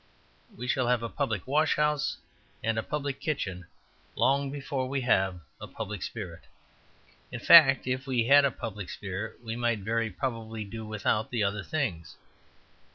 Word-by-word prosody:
We 125 +3 -5
shall 130 -1 +1
have 120 -1 +2
a 115 - -3
public 110 -9 -2
washhouse 150 +1 +1 0.5
and 110 0 +1
a - - 0
public 140 +1 -3
kitchen 95 - -3 0.5
long 140 +1 +2
before 135 -2 -3
we 135 0 -1
have 95 -7 +1 0.2
a - - -6
public - - -6
spirit; - - -6 0.9
in - - -5
fact, 135 -5 +8
if 130 +1 -2
we 125 -4 +1
had 140 +3 +7
a 140 - +4
public 105 -6 -6
spirit 105 +4 -6
we 115 -1 -4
might 120 -3 0
very 115 +2 0
probably 110 0 -4
do 110 +1 -7
without 105 +1 0
the 120 -4 0
other 100 +1 -1
things. 115 - -3
120 Hz, 160 wpm, -28 LUFS, 105-135 Hz, 0.9 s, fact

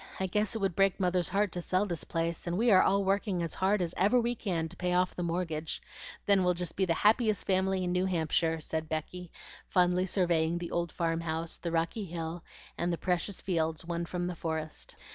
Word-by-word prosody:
I 190 - +1
guess 210 +3 0
it - - +1
would 190 -4 0
break 195 -1 +3
Mother's 180 -2 +1
heart 200 0 +1
to 175 - -3
sell 185 +3 +1
this 170 -5 -3
place, 165 0 -2
and 170 +1 -1
we 235 +2 +4
are 185 - +7
all 200 +1 +3
working 195 -2 +1
as 165 - -3
hard 190 0 +2
as 170 0 -3
ever 210 +7 +4
we 240 0 +1
can 180 -8 -2
to 170 - -12
pay 180 0 -1
off 180 0 +2
the - - -4
mortgage. 165 -2 -2 0.5
Then 200 -2 +4
we'll 180 0 +2
be - - -10
just 175 -2 -2
the 190 -1 +1
happiest 215 +3 +3
family 190 0 +1
in 180 - -1
New 180 +1 +1
Hampshire," 165 -2 +1
said 160 +1 -3
Becky, 165 +3 -4 0.4
fondly 180 0 +2
surveying 170 -3 +2
the 175 -1 -5
old 170 -1 -1
farm 165 -1 -1
house, 165 0 -3
the 170 - -3
rocky 170 +6 -1
hill, 165 -1 -5 0.4
and 175 +1 +1
the 170 - -1
precious 180 +3 -1
fields 160 -3 -1
won 170 0 -2
from 175 +1 -2
the 180 0 -3
forest. 160 -1 -4
180 Hz, 220 wpm, -30 LUFS, 165-190 Hz, 0.5 s, are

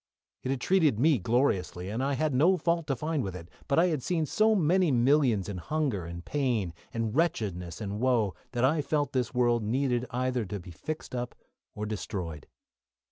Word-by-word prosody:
It - - -4
had 135 -1 0
treated 160 - +3
me 145 -1 +4
gloriously, 95 -5 0
and 110 +6 -2
I 140 +1 +1
had 150 +2 0
no 165 +9 +4
fault 170 -1 0
to 135 - 0
find 155 +3 -1
with 95 -3 -4
it, 85 -1 -9 0.2
but 140 - +1
I 175 +2 +5
had 155 -5 -1
seen 165 +2 0
so 215 +7 +3
many 180 0 +3
millions 125 -5 +3
in 100 -3 -4
hunger 135 - -1
and 85 +1 -7
pain, 120 - 0 0.2
and 115 0 -2
wretchedness 95 - -1
and 105 -1 -4
woe 120 -6 +2 0.2
that 120 0 +2
I 150 +3 +2
felt 145 -1 -1
this 125 -3 0
world 120 -1 +3
needed 125 +2 0
either 125 -1 -1
to 105 0 -5
be 90 0 -11
fixed 155 - -6
up 125 -1 -3 0.4
or 105 - -3
destroyed. 90 -8 -5
125 Hz, 190 wpm, -29 LUFS, 105-150 Hz, 0.4 s, I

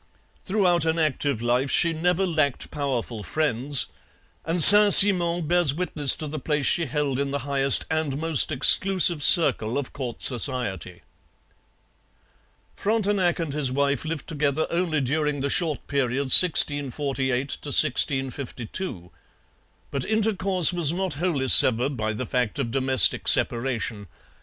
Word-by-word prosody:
Throughout 185 -5 -2
an 160 +1 -3
active 145 -6 -4
life 125 +3 -3
she 170 +3 0
never 180 +4 -3
lacked 155 -6 -4
powerful 130 -6 -7
friends, 140 - -2 0.6
and 165 +2 -5
Saint 205 +5 +11
Simon 175 -4 +6
bears 170 -4 -1
witness 155 -5 0
to 155 - -10
the 155 +1 -9
place 150 +1 -5
she 165 -2 -1
held 140 -1 -5
in 140 0 -5
the 140 -1 -7
highest 140 -1 +2
and 155 -4 -5
most 160 -2 -1
exclusive 180 +2 +2
circle 140 -8 +5
of 140 -2 -8
court 125 -4 -9
society. 120 - -2 1.7
Frontenac 205 -4 -3
and 165 -5 -7
his 145 -4 -5
wife 140 -1 -4
lived 160 -3 -8
together 150 -1 -4
only 170 -3 -4
during 150 +1 -5
the 140 0 -4
short 160 -5 -3
period 135 -1 -5
1648 140 -5 +1 0.7
52. 120 - -8 0.8
But 140 -2 -6
intercourse 195 -5 0
was 170 -4 0
not 185 +1 -6
wholly 145 -4 -5
severed 130 +2 +3
by 110 -2 -6
the 125 +4 -8
fact 125 -5 -5
of 115 - -6
domestic 130 0 +1
separation. 115 -4 -1
145 Hz, 135 wpm, -21 LUFS, 130-170 Hz, 1.7 s, Saint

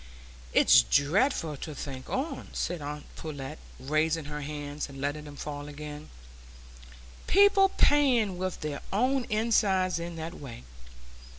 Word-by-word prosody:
"It's 60 - +7
dreadful 155 - +1
to 150 +2 -7
think 130 -2 -7
on," 275 +5 -3
said 175 -3 -2
aunt 150 +1 -6
Pullet, 150 -1 -7 0.2
raising 155 +3 0
her 150 0 -5
hands 145 0 -5
and 135 0 -10
letting 145 +2 -3
them 145 -1 -10
fall 145 0 -6
again, 150 0 -8 1.2
"people 395 0 +6
playing 245 - +3
with 185 -1 -3
their 150 -2 -4
own 255 +5 +1
insides 200 -5 +2
in 170 0 -5
that 165 +1 -5
way! 125 - -9
155 Hz, 130 wpm, -29 LUFS, 145-200 Hz, 1.2 s, It's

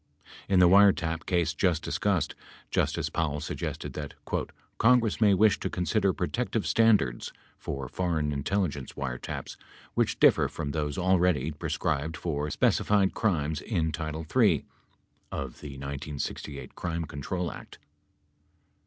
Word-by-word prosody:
In 95 - +4
the 90 -1 +7
wiretap 85 -4 +4
case 85 -3 +1
just 85 0 +1
discussed, - - 0 0.4
Justice - - 0
Powell 75 -2 -1
suggested - - -4
that 75 -2 -6 0.6
"Congress 115 -2 +4
may 105 -2 +6
wish 105 +2 +4
to - - -2
consider 95 +2 +1
protective - - -2
standards 105 - +3 0.3
(for 70 -2 -4
foreign 80 -2 -1
intelligence 75 -1 -2
wiretaps) 65 -2 -5 0.4
which - - 0
differ - - +5
from 75 -2 -4
those 75 -1 -2
already 90 -5 +2
prescribed 75 +1 -2
for 75 -3 -2
specified 100 +5 +2
crimes 80 -8 0
in 80 -7 -1
title 80 0 -4
III 80 - +2 0.7
(of 70 -3 -5
the 70 -2 -8
1968 70 +1 -5
Crime 85 -1 -3
Control 85 +4 -3
Act). - - -11
80 Hz, 125 wpm, -28 LUFS, 75-95 Hz, 0.7 s, the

